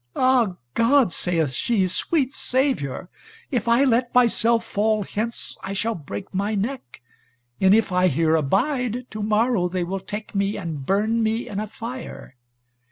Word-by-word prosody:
"Ah 255 -7 +3 0.2
God," 235 -4 +3
saith 165 -6 0
she, 190 - +1
"sweet 270 - +1
Saviour! 260 - -1 0.4
If 245 -4 -1
I 235 +3 +4
let 245 -2 +1
myself 235 -1 +3
fall 215 0 0
hence, 220 +4 -4
I 195 - -4
shall 225 +3 -1
break 140 - -8
my 200 +3 -1
neck, 205 - -4 0.6
and 190 +1 +5
if 225 -2 +2
here 175 -3 +2
I - - +3
abide, 245 - 0
to 215 - -5
morrow 215 -2 +2
they 180 0 -2
will 190 +3 -3
take 210 +3 -7
me 200 +1 0
and 160 -7 -5
burn 215 +4 +1
me 225 +1 0
in 200 - -4
a 215 - -3
fire. 235 - -8
215 Hz, 160 wpm, -23 LUFS, 185-240 Hz, 0.6 s, and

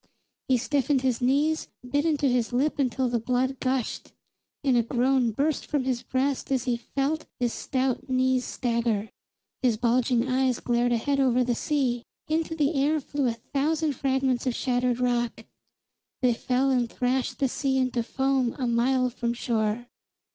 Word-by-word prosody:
He 260 - +4
stiffened 275 +1 +1
his 255 -2 0
knees, 290 +5 +2 0.2
bit 285 +4 0
into 295 -3 +1
his 245 -2 +1
lip 280 +5 0
until 260 -1 +1
the 240 -1 0
blood 255 +3 0
gushed; 260 -2 -2 0.5
and 265 -3 +3
a 240 - +5
groan 250 +1 +2
burst 285 +7 -1
from 290 -3 0
his 255 -2 -1
breast 260 +3 -1
as 260 -2 +1
he 245 -2 0
felt 275 +6 -2
his 240 -2 0
stout 260 0 -2
knees 255 0 +2
stagger. 230 -4 -1 0.5
His 240 -4 +2
bulging 245 +1 +2
eyes 255 -1 +1
glared 240 0 +1
ahead 275 +4 +1
over 255 -2 +3
the 245 0 0
sea; 255 -2 0 0.3
into 320 +1 -1
the 300 0 +1
air 295 +2 +2
flew 285 -1 -2
a 235 - +1
thousand 295 +6 -1
fragments 265 -1 0
of 245 - 0
shattered 250 -1 0
rock; 240 -1 -1 0.8
they 245 -1 +4
fell 255 +3 +1
and 245 -3 +1
thrashed 255 +1 -1
the 275 - +2
sea 265 +1 -1
into 255 -2 +1
foam 265 0 0
a 260 - -2
mile 250 +2 +2
from 235 0 -2
shore. 225 -1 -1
255 Hz, 165 wpm, -26 LUFS, 240-275 Hz, 0.8 s, a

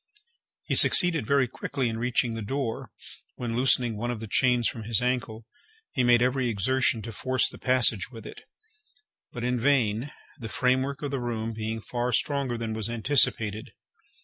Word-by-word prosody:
He - - -3
succeeded 170 - +5
very 140 -2 +3
quickly 135 +2 -3
in 115 -1 -3
reaching 120 -1 0
the 115 - -5
door, 120 +1 -4 0.5
when, 120 -2 -4
loosening 125 -2 +2
one 120 +3 -3
of 120 -3 -3
the 110 - -6
chains 125 +2 +2
from 115 - -4
his 115 0 +1
ankle, 125 -3 -2 0.5
he 130 - 0
made 120 0 +4
every 125 0 0
exertion 115 +2 +1
to 115 - -6
force 130 +4 0
the - - -10
passage 125 -6 +2
with 115 -4 -12
it, - - -10 0.9
but 120 - -6
in 125 0 0
vain, 125 -1 +1 0.3
the 115 -3 -7
framework 130 +4 0
of 145 - -3
the 135 -2 -2
room 115 -2 -3
being 110 +1 -4
far 120 +2 -3
stronger 140 -2 0
than 115 -1 -4
was 110 0 -3
anticipated. 110 -3 +1
120 Hz, 175 wpm, -26 LUFS, 115-130 Hz, 0.9 s, succeeded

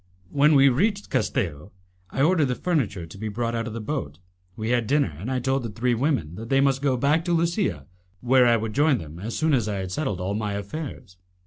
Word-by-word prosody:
When 150 +2 +4
we 135 0 +7
reached 200 - +1
Castello, 85 +1 -2 0.4
I 135 - 0
ordered 160 -1 +4
the 125 - -1
furniture 110 - -1
to 80 - -12
be 110 - -3
brought 115 +2 -2
out 115 0 -2
of 115 - -6
the 115 - -4
boat; 105 - -4 0.4
we 110 +2 -3
had 120 -3 +1
dinner, 140 - +1
and 105 +8 -5
I 130 - 0
told 135 +2 0
the 115 - -4
three 120 +4 0
women 125 - 0
that 115 +2 -7
they 135 - +3
must 135 -1 +2
go 135 -3 +1
back 145 +6 +2
to 175 - +1
Lusia, 165 - 0 0.3
where 125 +2 +4
I 120 -1 +5
would 110 -1 -4
join 145 0 +3
them 80 -3 -9
as 110 +5 -4
soon 160 -1 +2
as 120 -6 +2
I 105 - -2
had 95 -1 -4
settled 120 - -2
all 95 +2 -2
my 105 -1 -2
affairs. 100 - -6
120 Hz, 235 wpm, -25 LUFS, 105-140 Hz, 0.4 s, we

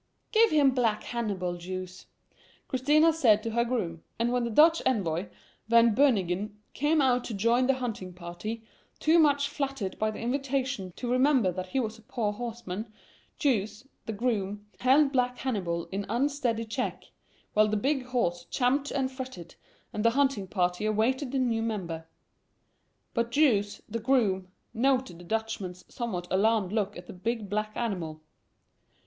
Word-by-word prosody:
"Give 450 0 +5
him 290 -3 +4
black 230 -4 +1
Hannibal, 195 -7 -2
Jous," 185 +1 -7 0.6
Christina 295 +4 +3
had 330 - +5
said 220 -9 +4
to 230 - -2
her 235 +1 +2
groom; 200 -10 -2 0.2
and 235 +1 +1
when 250 -1 +1
the - - -2
Dutch 320 +8 +5
envoy, 185 -7 0 0.4
Van 230 0 +5
Beunigen, 210 -5 +1
came 300 +2 +2
out 250 -2 +3
to 225 - -4
join 235 +5 +3
the 270 - +3
hunting 225 -8 -4
party, 180 +6 -6 0.3
too 325 +2 +4
much 285 -2 +4
flattered 275 -8 -3
by 215 - +1
the 215 - -6
invitation 260 -5 -2
to 245 -1 -3
remember 255 -6 +4
that 185 +1 -5
he 265 - -1
was 225 -2 -3
a - - -17
poor 220 -2 -2
horseman, 220 -2 -5 0.5
Jous, 225 -3 0 0.2
the - - -1
groom, 205 -3 -2
held 275 +3 +4
black 250 -2 +1
Hannibal 180 -10 -2
in 195 +1 -3
unsteady 245 -2 0
check, 240 +4 -4 0.4
while 215 0 +5
the 215 0 0
big 270 +4 0
horse 175 -9 -1
champed 270 +3 +1
and 265 -1 -1
fretted, 260 - -8 0.4
and 210 - -2
the 230 - +6
hunting 265 -6 +1
party 180 0 0
awaited 245 +5 +1
the 275 - -1
new 235 -3 +1
member. 175 -8 -3 1.1
But 235 -1 0
Jous, 215 -7 +2
the 230 +2 -3
groom, 215 -7 +2 0.3
noted 255 -7 +1
the 175 - -12
Dutchman's 205 -4 -3
somewhat 190 -8 -3
alarmed 205 0 +2
look 210 -2 -1
at 175 - -9
the - - -9
big 210 +3 -3
black 215 +1 -1
animal. 170 -9 -3
230 Hz, 160 wpm, -28 LUFS, 195-260 Hz, 1.1 s, the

